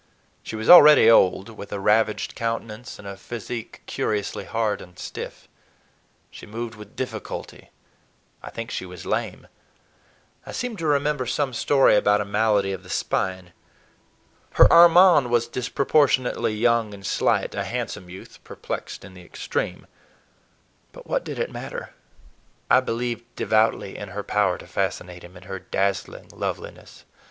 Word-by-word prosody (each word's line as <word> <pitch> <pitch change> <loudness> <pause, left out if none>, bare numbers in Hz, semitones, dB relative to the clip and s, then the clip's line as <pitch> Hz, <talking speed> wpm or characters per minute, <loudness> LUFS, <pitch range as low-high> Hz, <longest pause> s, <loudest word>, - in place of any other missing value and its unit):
She - - -7
was 110 +1 -5
already 150 -9 +9
old, 95 -1 +4
with 105 -2 -10
a 100 - -3
ravaged 105 +1 +1
countenance 115 +1 -5
and 100 - -11
a 100 - -6
physique 115 +3 -7
curiously 105 -1 -3
hard 110 -2 -1
and 90 0 -14
stiff. - - -8 0.8
She - - -12
moved 115 +2 -6
with 105 -1 -13
difficulty—I 130 - -9
think 115 0 -7
she 95 - -4
was 90 -1 -10
lame—I - - -8
seem 245 -2 -3
to 165 -3 -3
remember 145 -2 +1
some 130 +2 -1
story 135 0 +4
about 105 0 +3
a 105 - -2
malady 105 -1 +1
of 95 - -6
the 90 - -16
spine. 95 -2 -2 1.0
Her - - +7
Armand 170 -5 +7
was 120 -1 +1
disproportionately 130 -1 +1
young 115 -1 +1
and 100 -1 -12
slight, - - 0
a - - -2
handsome 90 - -5
youth, 95 +2 -12
perplexed - - -7
in 95 - -13
the 90 - -13
extreme. - - -4 1.1
But - - -13
what - - -1
did - - -6
it - - -2
matter? - - -7 0.8
I 125 - +7
believed 120 -1 -3
devoutly 110 -2 +1
in 105 - -7
her 100 +2 -5
power 100 -4 +1
to - - -12
fascinate 90 -1 -4
him, 90 +1 -13
in 90 - -14
her 95 +1 -7
dazzling 100 +1 -3
loveliness. - - -7
110 Hz, 145 wpm, -23 LUFS, 100-125 Hz, 1.1 s, already